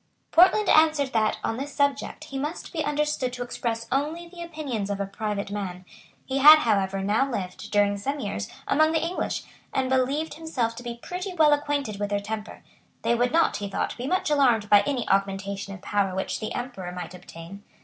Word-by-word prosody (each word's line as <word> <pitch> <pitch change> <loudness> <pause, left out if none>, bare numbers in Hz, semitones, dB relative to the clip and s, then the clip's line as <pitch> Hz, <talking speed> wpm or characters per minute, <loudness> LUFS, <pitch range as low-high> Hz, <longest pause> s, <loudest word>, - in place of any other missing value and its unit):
Portland 380 +5 +5
answered 310 -4 +4
that, 215 -1 +2
on 225 - -1
this 280 +2 -6
subject, 280 -1 0
he 270 - -6
must 300 +5 -5
be 315 -3 -1
understood 295 -3 0
to 245 0 -4
express 230 -1 -3
only 305 +6 -1
the 345 0 -11
opinions 290 -11 -4
of 200 -1 -2
a 200 - -1
private 200 0 -4
man. 185 -3 -5 0.4
He 270 +1 -1
had 305 +3 +10
however 195 -7 +1
now 220 +7 +2
lived, 200 -2 -5
during 205 -1 +2
some 275 +8 -3
years, 150 - -4 0.2
among 310 +2 +3
the 320 - +1
English, 355 +2 -2 0.3
and 260 -1 -1
believed 270 +5 +1
himself 275 -8 -2
to - - -6
be 240 -1 -6
pretty 365 +1 -5
well 305 -3 +5
acquainted 285 -7 -1
with 205 0 -2
their 205 0 0
temper. 215 +1 -6 0.4
They - - +2
would 245 +1 +1
not, 330 +2 +3
he 200 -1 -5
thought, - - -2
be 250 +2 -5
much 370 -1 0
alarmed 240 -8 +3
by 205 -1 +8
any 265 -4 -1
augmentation 195 0 -1
of 190 - -14
power 200 -2 0
which 190 - -2
the 215 - -4
Emperor 240 -8 -5
might 180 -1 -7
obtain. 180 +2 -11
245 Hz, 200 wpm, -26 LUFS, 200-295 Hz, 0.4 s, had